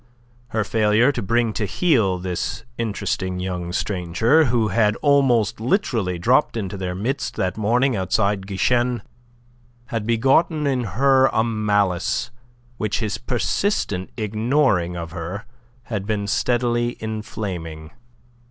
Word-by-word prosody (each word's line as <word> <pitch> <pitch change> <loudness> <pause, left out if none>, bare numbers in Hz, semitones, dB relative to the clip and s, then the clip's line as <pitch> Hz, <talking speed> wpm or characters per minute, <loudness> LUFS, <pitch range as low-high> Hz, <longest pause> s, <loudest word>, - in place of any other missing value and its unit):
Her 110 -2 -1
failure 110 +5 +3
to - - -4
bring 115 +2 +1
to 105 - -1
heel 110 - +2
this 90 -1 -3
interesting 95 -4 -2
young 90 -2 -3
stranger, 100 - +2
who 120 -4 +1
had 105 -2 +2
almost 135 -8 +3
literally 115 - 0
dropped 120 +7 +2
into 100 -3 -3
their 90 -2 -4
midst 120 +9 -2
that 95 0 -1
morning 120 +5 +2
outside 95 +1 0
Guichen, 120 +5 +1 0.9
had 115 -2 -2
begotten 135 +7 +2
in 130 -3 0
her 135 0 +5
a 110 - +1
malice 105 -6 0 0.5
which 105 -2 -1
his 110 -3 -2
persistent 120 - -1
ignoring 110 - +1
of 85 -1 -6
her 90 +6 -6 0.4
had 105 -5 -4
been 105 -2 -1
steadily 120 +2 0
inflaming. 95 -8 -5
110 Hz, 125 wpm, -22 LUFS, 95-120 Hz, 0.9 s, her